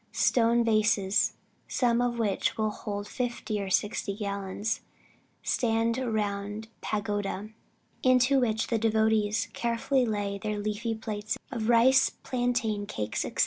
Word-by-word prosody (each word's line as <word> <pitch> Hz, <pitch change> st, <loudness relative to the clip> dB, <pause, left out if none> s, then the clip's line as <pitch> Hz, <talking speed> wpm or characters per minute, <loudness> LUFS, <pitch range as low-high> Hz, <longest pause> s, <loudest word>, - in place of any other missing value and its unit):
Stone 235 Hz, 0 st, +3 dB
vases, 215 Hz, -3 st, +2 dB, 0.3 s
some 240 Hz, -1 st, +2 dB
of 245 Hz, -1 st, 0 dB
which 210 Hz, -4 st, 0 dB
will 215 Hz, -1 st, +1 dB
hold 205 Hz, -1 st, -5 dB
fifty 235 Hz, -4 st, -3 dB
or 195 Hz, -, -4 dB
sixty 200 Hz, +1 st, 0 dB
gallons, 200 Hz, 0 st, -3 dB, 0.6 s
stand 230 Hz, 0 st, +1 dB
round 210 Hz, -3 st, -2 dB
the 220 Hz, -, -15 dB
pagoda, 205 Hz, 0 st, -2 dB, 0.5 s
into 255 Hz, +1 st, +4 dB
which 220 Hz, -3 st, +1 dB
the 230 Hz, -, 0 dB
devotees 220 Hz, -1 st, +2 dB
carefully 235 Hz, +3 st, +1 dB
lay 205 Hz, -2 st, -2 dB
their 210 Hz, +1 st, -2 dB
leafy 215 Hz, +2 st, -2 dB
plates 215 Hz, -1 st, -4 dB
of 230 Hz, -3 st, -2 dB
rice, 260 Hz, +3 st, +6 dB
plantain, 240 Hz, -5 st, -1 dB
cakes, 105 Hz, -, -3 dB
&c. -, -, -3 dB
220 Hz, 130 wpm, -28 LUFS, 205-235 Hz, 0.6 s, rice